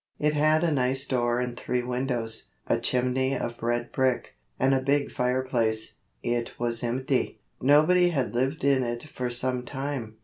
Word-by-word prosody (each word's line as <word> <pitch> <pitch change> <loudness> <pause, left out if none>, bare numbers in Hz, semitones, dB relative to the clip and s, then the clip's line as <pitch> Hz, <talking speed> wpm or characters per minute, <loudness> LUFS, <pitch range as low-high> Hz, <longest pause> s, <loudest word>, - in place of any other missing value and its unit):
It 150 0 +1
had 155 +2 +3
a 170 - +2
nice 135 -1 +1
door 120 -2 0
and 125 -1 -2
three 125 0 -2
windows, 125 -3 0 0.2
a - - +1
chimney 130 +2 0
of 120 0 -5
red 120 +1 -1
brick, 130 -2 0 0.3
and 135 +1 +3
a 135 - +3
big 140 +2 +1
fireplace. 125 -3 0 0.3
It 120 0 -2
was 120 0 -1
empty 130 0 -1 0.2
nobody 155 +6 +5
had 135 -8 -1
lived 135 +6 -1
in 140 -1 +4
it 120 -1 -3
for 130 -5 -4
some 125 +1 0
time. 135 -4 -5
125 Hz, 165 wpm, -27 LUFS, 120-140 Hz, 0.3 s, nobody